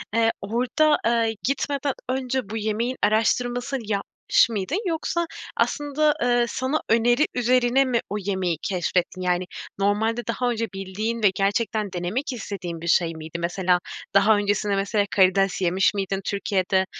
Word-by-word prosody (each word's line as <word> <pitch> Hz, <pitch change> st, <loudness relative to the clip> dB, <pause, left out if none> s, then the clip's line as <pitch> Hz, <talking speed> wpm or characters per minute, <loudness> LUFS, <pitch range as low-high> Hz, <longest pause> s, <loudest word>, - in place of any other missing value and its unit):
eee, 225 Hz, 0 st, +4 dB
orada, 250 Hz, +8 st, +2 dB
eee, 230 Hz, -1 st, +2 dB
gitmeden 280 Hz, 0 st, -1 dB, 0.2 s
önce 255 Hz, -3 st, -2 dB
bu 220 Hz, -, -3 dB
yemeğin 220 Hz, +4 st, -1 dB
araştırmasını 245 Hz, +5 st, +1 dB
yapmış 205 Hz, +2 st, +1 dB
mıydın 225 Hz, -, -2 dB
yoksa 340 Hz, +1 st, -1 dB, 0.3 s
aslında, 295 Hz, +1 st, +1 dB
eee, 240 Hz, 0 st, +3 dB
sana 260 Hz, +6 st, -1 dB
öneri 240 Hz, +5 st, +4 dB
üzerine 250 Hz, +2 st, +3 dB
mi 250 Hz, -3 st, +1 dB
o 205 Hz, -, -3 dB
yemeği 190 Hz, -4 st, -1 dB
keşfettin? 180 Hz, 0 st, -1 dB
Yani, 180 Hz, 0 st, 0 dB, 0.3 s
normalde 215 Hz, +4 st, +1 dB
daha 245 Hz, +2 st, 0 dB
önce 230 Hz, -1 st, -1 dB
bildiğin 210 Hz, +4 st, -3 dB
ve 200 Hz, -, +6 dB
gerçekten 205 Hz, +1 st, 0 dB
denemek 190 Hz, -, -2 dB
istediğin 185 Hz, -7 st, -6 dB
bir 170 Hz, -, -6 dB
şey 170 Hz, 0 st, +3 dB
miydi? 160 Hz, +1 st, -7 dB
Mesela 180 Hz, +1 st, +1 dB, 0.4 s
daha 210 Hz, +2 st, +5 dB
öncesinde 205 Hz, 0 st, 0 dB
mesela 200 Hz, +1 st, +1 dB
karides 195 Hz, 0 st, +3 dB
yemiş 185 Hz, +3 st, +2 dB
miydin 195 Hz, -1 st, -2 dB
Türkiye'de? 190 Hz, -1 st, 0 dB
215 Hz, 140 wpm, -24 LUFS, 195-245 Hz, 0.4 s, ve